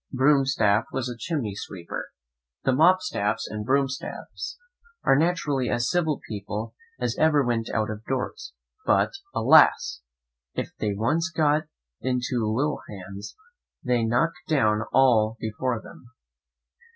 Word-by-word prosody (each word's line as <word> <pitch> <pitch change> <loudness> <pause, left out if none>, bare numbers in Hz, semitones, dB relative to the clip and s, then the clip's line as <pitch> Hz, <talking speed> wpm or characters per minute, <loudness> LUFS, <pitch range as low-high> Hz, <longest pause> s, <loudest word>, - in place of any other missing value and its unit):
Broomstaff 130 -6 +3
was 130 -1 -2
a 125 - -5
chimney 130 - -3
sweeper. 90 -3 -6 0.5
The 135 - +3
Mopstaffs 130 - +2
and 105 0 -5
Broomstaffs 135 +2 -2 0.5
are - - +5
naturally 145 -5 +1
as 120 +1 0
civil 160 -4 +1
people 105 +1 -5 0.3
as - - -1
ever 150 -3 +4
went 115 -2 -1
out 110 -1 -1
of 105 0 -7
doors; 130 -1 -3 0.3
but, - - +3 0.2
alas! - - +5 0.5
if - - -3
they 105 -2 -1
once 150 - +1
get 155 -1 +1 0.3
into 125 -4 -1
ill 150 +1 0
hands, 100 0 -8 0.5
they 125 -1 +2
knock 120 +9 +2 0.2
down 110 -8 +3
all 115 -4 +4
before 115 +2 -2
them. 120 - -14
125 Hz, 125 wpm, -25 LUFS, 110-145 Hz, 0.5 s, are